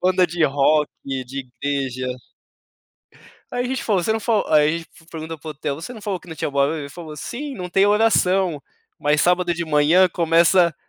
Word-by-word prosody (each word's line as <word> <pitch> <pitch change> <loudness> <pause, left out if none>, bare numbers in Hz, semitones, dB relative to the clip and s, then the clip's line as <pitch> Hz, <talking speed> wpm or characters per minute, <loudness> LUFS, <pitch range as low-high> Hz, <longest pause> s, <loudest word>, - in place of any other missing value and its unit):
Banda 185 0 +3
de 170 -1 0
rock, 145 +2 +2 0.2
de 135 -1 -5
igreja. 135 -3 -2 1.5
Aí 245 0 -1
a - - -2
gente 260 0 -3
falou: 195 -5 +1
"Você 220 - +1
não 220 - 0
falou", 220 -2 +1
aí 155 +2 +3
f 165 0 -19
pergunta 160 0 -7
para 155 - -12
o - - -3
hotel, 140 -1 -4
"Você 170 - -8
não 220 - -11
falou 200 -4 -3
que - - -19
não 160 - -8
tinha 150 - -2
o - - -12
barulho?", 140 +1 0
falou: 155 +1 -9
"Sim, 275 - -6
não 180 -2 -6
tem 195 +2 +3
oração, 190 -6 +2 0.4
mas 150 0 +2
sábado 180 0 +2
de 170 0 -3
manhã 160 +4 +4
começa 170 0 +3
165 Hz, 200 wpm, -21 LUFS, 150-185 Hz, 1.5 s, manhã